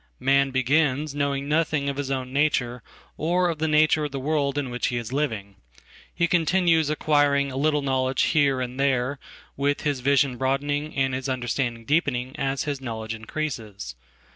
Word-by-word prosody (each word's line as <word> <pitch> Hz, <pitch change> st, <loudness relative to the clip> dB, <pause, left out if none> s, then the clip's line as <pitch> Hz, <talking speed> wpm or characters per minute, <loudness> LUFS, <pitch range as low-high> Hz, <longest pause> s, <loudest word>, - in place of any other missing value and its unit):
Man 140 Hz, +1 st, +3 dB
begins 140 Hz, +2 st, +1 dB
knowingnothing 145 Hz, +1 st, 0 dB
of 140 Hz, -1 st, -2 dB
his 145 Hz, -1 st, -3 dB
own 130 Hz, -1 st, -3 dB
nature 130 Hz, -4 st, +1 dB, 0.4 s
or 175 Hz, +3 st, +1 dB
of 165 Hz, -3 st, -3 dB
the 160 Hz, -, 0 dB
nature 155 Hz, 0 st, +3 dB
of 145 Hz, -, -5 dB
the 135 Hz, -, -4 dB
world 145 Hz, 0 st, 0 dB
in 135 Hz, -3 st, -2 dB
which 120 Hz, -, -1 dB
heis 120 Hz, -1 st, -4 dB
living. 110 Hz, -9 st, -2 dB, 0.5 s
He 170 Hz, -, +1 dB
continues 165 Hz, -2 st, +3 dB
acquiring 145 Hz, -2 st, +2 dB
a -, -, -7 dB
little 150 Hz, +1 st, +1 dB
knowledge 130 Hz, -1 st, +1 dB
here 145 Hz, -4 st, +3 dB
andthere, 130 Hz, +1 st, 0 dB, 0.4 s
with 145 Hz, +1 st, 0 dB
his 145 Hz, -3 st, -1 dB
vision 135 Hz, 0 st, +2 dB
broadening 145 Hz, +3 st, -1 dB
and 135 Hz, -1 st, +1 dB
his 130 Hz, +1 st, -3 dB
understanding 120 Hz, -2 st, -2 dB
deepeningas 135 Hz, -2 st, 0 dB
his 145 Hz, -2 st, -3 dB
knowledge 110 Hz, -3 st, -4 dB
increases. 110 Hz, -, -5 dB
140 Hz, 155 wpm, -25 LUFS, 130-150 Hz, 0.5 s, Man